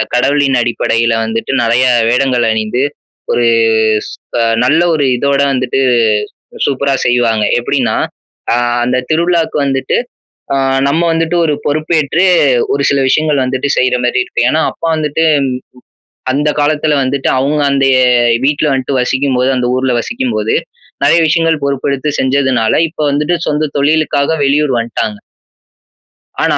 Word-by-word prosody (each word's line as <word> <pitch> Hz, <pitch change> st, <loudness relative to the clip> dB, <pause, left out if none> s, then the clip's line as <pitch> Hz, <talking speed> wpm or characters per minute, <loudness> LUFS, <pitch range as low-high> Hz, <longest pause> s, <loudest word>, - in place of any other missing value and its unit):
கடவுளின் 135 Hz, +1 st, +2 dB
அடிப்படையில 115 Hz, -1 st, 0 dB
வந்துட்டு 115 Hz, +4 st, -3 dB
நறைய 120 Hz, +3 st, +2 dB, 0.2 s
வேடங்கள் 125 Hz, -1 st, +1 dB
அணிந்து, 110 Hz, +3 st, -1 dB, 0.5 s
ஒரு 120 Hz, -, +1 dB, 0.6 s
ஸ் -, -, -9 dB, 0.3 s
அ -, -, +2 dB, 0.2 s
நல்ல 155 Hz, +6 st, +3 dB
ஒரு 145 Hz, -, 0 dB
இதோட 140 Hz, +1 st, 0 dB
வந்துட்டு 130 Hz, 0 st, -1 dB, 0.9 s
சூப்பரா 140 Hz, 0 st, 0 dB
செய்வாங்க. 120 Hz, -3 st, +1 dB, 0.2 s
எப்பிடின்னா, 130 Hz, +1 st, -1 dB, 0.6 s
அ -, -, +1 dB, 0.3 s
அந்த 125 Hz, +1 st, 0 dB, 0.2 s
திருவிழாவுக்கு 170 Hz, -1 st, 0 dB
வந்துட்டு 135 Hz, -1 st, -1 dB, 0.6 s
அ -, -, +1 dB, 0.3 s
நம்ம 160 Hz, +5 st, +1 dB
வந்துட்டு 165 Hz, +1 st, -1 dB
ஒரு 150 Hz, -, +1 dB
பொறுப்பேற்று 155 Hz, +2 st, 0 dB, 0.5 s
ஒரு 140 Hz, -, 0 dB
சில 140 Hz, -, +1 dB
விஷயங்கள் 150 Hz, 0 st, +1 dB
வந்துட்டு 130 Hz, +2 st, -2 dB
செய்றமாரி 125 Hz, 0 st, +1 dB
இருக்கும். 120 Hz, -, -1 dB
ஏன்னா, 160 Hz, -, +1 dB
அப்பா 165 Hz, -, -5 dB
வந்துட்டு 155 Hz, +1 st, -1 dB, 1.1 s
அந்த 145 Hz, +3 st, 0 dB
காலத்துல 150 Hz, 0 st, +1 dB
வந்துட்டு 130 Hz, +1 st, -2 dB
அவுங்க 145 Hz, +3 st, 0 dB
அந்த 135 Hz, 0 st, +1 dB, 0.6 s
வீட்டல 145 Hz, +1 st, +1 dB
வந்துட்டு 135 Hz, 0 st, -2 dB
வசிக்கும்போது 130 Hz, 0 st, 0 dB
அந்த 125 Hz, -1 st, -1 dB
ஊர்ல 130 Hz, 0 st, 0 dB
வசிக்கும் 120 Hz, +1 st, -3 dB
போது, 110 Hz, +1 st, 0 dB, 0.5 s
நறைய 170 Hz, -, +4 dB
விஷயங்கள் 165 Hz, -1 st, +1 dB
பொறுப்பெடுத்து 140 Hz, +1 st, -2 dB
செஞ்சதுனால 130 Hz, -4 st, +1 dB, 0.2 s
இப்ப 155 Hz, -, -7 dB
வந்துட்டு 150 Hz, +5 st, 0 dB
சொந்த 150 Hz, 0 st, -1 dB
தொழிலுக்காக 150 Hz, +1 st, +1 dB
வெளியூர் 145 Hz, 0 st, +1 dB
வந்ட்டாங்க. 110 Hz, -2 st, -3 dB, 1.2 s
ஆனா, -, -, +1 dB
140 Hz, 130 wpm, -13 LUFS, 125-150 Hz, 1.2 s, நறைய